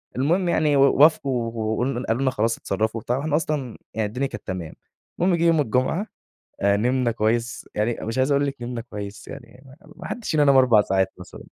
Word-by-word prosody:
المهم 170 +8 +1
يعني 150 -3 +2
و 135 - +4 0.2
وافقوا 135 -6 +3
و 110 -1 -2
وقلن 125 0 -2
قالوا 115 +4 -1
لنا 130 -1 +2
خلاص 115 -1 0
اتصرّفوا 110 +1 -2
وبتاع، 120 +4 -1
وإحنا 150 +2 -1
أصلًا 150 -6 -2 0.2
يعني 110 -1 -1
الدنيا 130 +6 -2
كانت - - -10
تمام، 90 -4 -5 0.5
المهم 180 +1 +3
جيه 170 0 0
يوم 160 -2 +4
الجمعة 135 - 0 0.6
نمنا 120 +5 +2
كويس 115 +1 -1
يعني، 110 +3 0
مش 115 +3 -3
عايز 130 +2 +2
أقول 140 0 +2
لِك 140 - -4
نمنا 120 -1 -4
كويس 105 -3 -8
يعني، 125 +2 -11
م 145 +9 -17
ما - - -9
حدّش 235 - -5
فينا 150 -2 +3
نام 140 -1 +5
4 120 -5 +5
ساعات 95 -1 0
مثلًا. 90 - -11
125 Hz, 200 wpm, -23 LUFS, 110-145 Hz, 0.6 s, نام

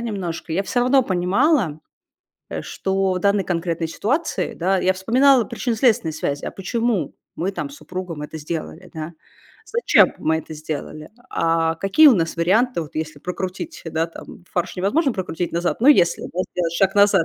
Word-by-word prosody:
немножко, 185 -7 -4
я 190 +5 +1
всё 245 +5 -1
равно 260 +2 +4
понимала, 190 - +1 0.7
э, - - -5
что 190 0 -1
в 180 - -1
данной 200 0 +2
конкретной 170 -2 -2
ситуации, 265 - -1
да, 190 +2 +1
я 185 +1 +2
вспоминала 245 +6 +4
причинно-следственные 225 - +1
связи. 145 -2 -3
А - - -3
почему 220 - -1 0.2
мы 180 +3 -1
там 285 - -4
с 285 - -11
супругом 180 - -6
это 160 +1 -7
сделали, 160 +3 -6
да? 160 +1 -5 0.5
Зачем 470 0 +4
мы 160 0 +1
это 160 - -7
сделали? 155 0 -6 0.2
А 165 0 +1
какие 195 - +5
у 260 - +6
нас 165 -3 -1
варианты 195 +4 +2
вот, 155 - -12
если 155 -2 -4
прокрутить, 185 - -5
да, 160 +1 -1
там, 170 +1 -12
"фарш 175 +1 -2
невозможно 260 - +1
прокрутить 175 -2 -3
назад", 175 +5 -1
но, 260 - +5
если, 175 -12 +5
да, 180 - -4
сделать 170 -2 -1
шаг 195 +2 +2
назад, 200 -4 +5
185 Hz, 170 wpm, -21 LUFS, 165-220 Hz, 0.7 s, у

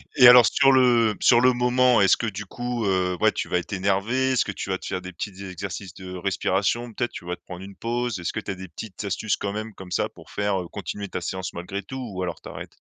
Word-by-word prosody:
Et 125 -3 +9
alors, 125 -1 +10
sur 135 -1 +4
le 120 -5 +4
sur 120 - +6
le 125 0 +5
moment, 125 -1 +3
est-ce 95 - +5
que, 115 - -2
du 105 0 -5
coup, 120 +1 -3
heu, 90 -2 +1
ouais, - - +5
tu - - -3
vas 90 - +1
être 85 +4 -8
énervé? 100 +8 +1
Est-ce 125 - +2
que 100 - -3
tu 95 - -6
vas 95 - 0
te - - -12
faire 90 - -3
des 90 0 -8
petits 95 +3 -6
exercices 95 +1 -6
de 95 -1 -9
respiration? 100 +5 -1
Peut-être 120 +2 -2
tu 85 - -9
vas 90 0 -3
te - - -34
prendre 90 +1 -8
une 100 0 -10
pause? 120 -3 -2
Est-ce 85 - -3
que 110 - -2
tu 100 - -5
as - - -4
des 95 0 -9
petites 95 +4 -8
astuces, 100 +3 -1
quand 100 - -3
même, 110 0 -5
comme 90 -1 -11
ça, - - 0
pour - - -16
faire, 100 -2 0
heu, 85 - -7
continuer 100 +2 -6
ta 90 - -4
séance 95 0 -4
malgré 95 +4 -5
tout 130 - -7
ou 95 0 -3
alors 85 -2 -4
tu - - -9
arrêtes? - - -9
100 Hz, 270 wpm, -24 LUFS, 95-120 Hz, -, alors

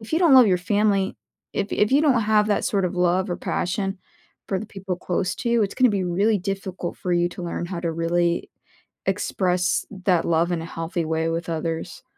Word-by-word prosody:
if 220 +7 -11
you - - +3
don't 335 -7 +5
love 255 -3 +8
your 185 -2 +3
family 200 0 +1 0.4
if 200 0 -2
if 210 +4 +2
you 280 - +5
don't 275 -7 +3
have 215 0 +3
that 205 - +1
sort 195 -2 +1
of 180 - -4
love 180 +2 +2
or 175 - -1
passion 195 +1 -2 0.5
for 190 - 0
the 220 - -5
people 195 -4 -5
close 185 +1 -2
to 235 - -3
you, 235 -2 +3
it's 195 - -2
gonna 255 -3 +4
be 195 -2 0
really 200 +5 +2
difficult 190 -2 -4
for 180 - -3
you 175 0 +2
to 175 - -9
learn 175 0 -3
how 175 -1 -5
to 170 -2 -2
really 170 +1 0 0.6
express 180 -1 0 0.2
that 180 -4 +3
love 170 +1 +2
in 170 -2 -1
a - - -6
healthy 165 +1 -3
way 160 +1 0
with 165 +1 -3
others. 165 +6 -4
185 Hz, 215 wpm, -23 LUFS, 175-205 Hz, 0.6 s, love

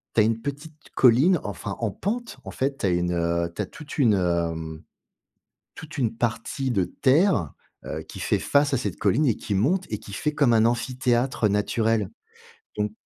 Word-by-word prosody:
tu 110 - +6
as - - +5
une 115 +1 0
petite 145 +4 -6 0.2
colline, 135 +9 +5
enfin 100 0 -5
en 115 -3 -1
pente. 230 - -4
En - - -6
fait, 135 +1 -2
tu - - -1
as - - +2
une, 90 0 0
heu, 85 0 0
tu - - -2
as - - -3
toute 150 -1 -9
une, 115 -6 +5
heu, 85 -3 0
mmh, 80 -1 -7 0.9
toute 155 -2 -10
une 115 -4 0
partie 120 +3 -2
de 95 -6 +2
terre, 135 - +2 0.3
heu, - - -5
qui - - -10
fait - - +1
face 145 -1 +2
à - - +3
cette 125 - -3
colline 115 +9 +2
et 120 - +3
qui 105 - -4
monte 175 - +1
et 105 - -2
qui 100 - -12
fait 150 - -1
comme 140 -5 +4
un 110 -1 +4
amphithéâtre 120 -1 +1
naturel, 105 0 0 0.7
donc 105 0 0
115 Hz, 200 wpm, -25 LUFS, 100-140 Hz, 0.9 s, tu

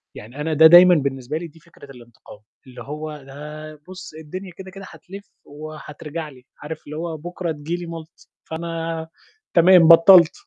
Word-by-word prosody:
يعني 120 +7 -10
أنا 155 +1 -2
ده 160 +2 +7
دايمًا 175 +1 +8
بالنسبة 140 0 -3
لي 170 +1 -7
دي 165 +1 -20
فكرة 155 -4 -17
الإنتقام، 120 -4 -16 0.3
اللي 125 - -12
هو 150 +1 -7
ده 150 +3 -10
بُصّ، 185 0 -11
الدنيا 185 +5 -9
كده، 190 -1 -10
كده 195 0 -11
هتلِف 195 +2 -12 0.2
وهترجع 155 +1 -9
لي، 125 -3 -18
عارف 155 +1 -8
اللي 150 +1 -8
هو 165 -1 -5
بُكرة 175 +2 -6
تيجي 155 +2 -5
لي 175 0 -7
ملط، 165 -1 -12 0.2
فأنا 165 0 -5 0.5
تمام 175 -1 +6
بطّلت. 170 0 +7
160 Hz, 165 wpm, -21 LUFS, 150-170 Hz, 0.5 s, دايمًا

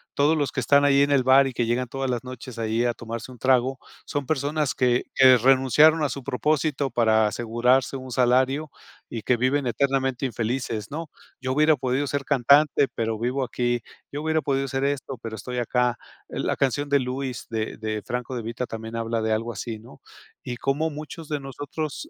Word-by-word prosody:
todos 150 +3 +3
los 145 -2 0
que - - -3
están 145 0 +4
ahí 140 0 +4
en 140 - +3
el 135 -3 +4
bar, 135 +1 +6
y 130 - -5
que 120 - 0
llegan 120 +2 0
todas 135 +2 -3
las 120 -1 -2
noches 125 -1 -9
ahí 115 +2 0
a 120 - +1
tomarse 115 +2 -7
un 125 - -13
trago, 130 0 +2 0.3
son 145 -1 -3
personas 150 0 0
que 125 -1 +2
que 130 -1 +7
renunciaron 135 +6 +5
a 145 - +1
su 140 - -6
propósito 140 +2 0
para 110 -2 +3
asegurarse 120 +4 +1
un 130 -1 -9
salario, 130 +4 +2 0.4
y 115 -3 -6
que 125 - +2
viven 130 +3 +1
eternamente 135 0 0
infelices, 115 -2 -3
¿no? 160 +1 -5 0.3
"Yo 130 0 -2
hubiera 155 +2 +4
podido 130 +2 -1
ser 140 0 -2
cantante, 140 +1 +4
pero 115 -1 -1
vivo 125 +3 -1
aquí, 120 -1 -1 0.3
yo 145 +1 -4
hubiera 160 0 +1
podido 135 -1 -1
ser 135 +1 -2
esto, 140 -2 -2
pero 110 -1 -6
estoy 125 +4 -6
acá". 120 0 +1 0.3
Eh, - - -5
la - - 0
canción 145 +2 0
de 140 0 +4
Louis, 130 -1 -4
de 110 -1 -3
de 110 -1 -3
Franco 125 +1 -4
de 115 - -4
Vita, 120 +2 -4
también 110 0 -7
habla 115 0 -1
de 110 0 -1
algo 115 +2 -2
así, 110 +1 -6
¿no? 110 -9 -15 0.4
Y 120 -1 -5
cómo 145 +6 0
muchos 155 +1 -8
de 150 - -1
nosotros 145 - -6
130 Hz, 200 wpm, -24 LUFS, 120-140 Hz, 0.4 s, que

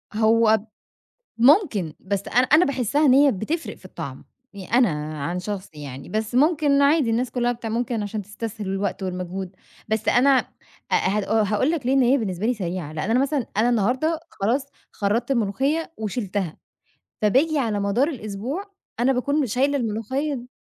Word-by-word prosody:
هو 220 0 +4 0.8
ممكن 240 - +4
بس 200 0 -3
أنا 250 +1 +3
أنا 315 +4 +5
باحسها 280 +2 +1
إن 255 - +6
هي 280 -1 +6
بتفرق 300 - -3
في - - -23
الطعم، - - -8 0.3
يع 200 +5 0
أنا 245 -5 +5 0.4
عن 175 +3 -2
شخصي 185 -6 -6
يعني، 135 -1 -8
بس 220 +2 -3
ممكن 290 0 +3
عادي 280 -4 +3
الناس 240 +2 0
كلها 245 -1 0
بتع 230 -1 -6
ممكن 230 -1 -1
عشان 205 +1 -4
تستسهل 210 +1 -6
الوقت 195 0 -2
والمجهود، 185 0 -5 0.3
بس 220 0 -1
أنا 265 +3 +5 0.6
آآ، - - +6
هأ 210 +2 +1
هاقول 215 +9 +1
لك 300 -7 -2
ليه 260 - +2
إن 270 -1 +4
هي 255 +3 +4
بالنسبة 200 -1 -2
لي 250 - +2
سريعة، 175 -6 -4
لأن 155 +8 -3
أنا 250 +3 +3
مثلًا 275 -3 0
أنا 230 +3 +3
النهاردة 255 +9 +1
خلاص 245 +8 -1 0.3
خرّطت 225 +5 -1
الملوخية 270 +8 0
وشِلتها، 205 -5 -3 0.7
فباجي 280 +8 +3
على 220 -5 0
مدار 200 +8 +1
الأسبوع 260 - -5 0.3
أنا 260 +3 +3
باكون 285 +3 0
شايلة 275 +6 +1
الملوخية 255 +6 -2
د 245 0 -8
230 Hz, 165 wpm, -23 LUFS, 205-270 Hz, 0.8 s, إن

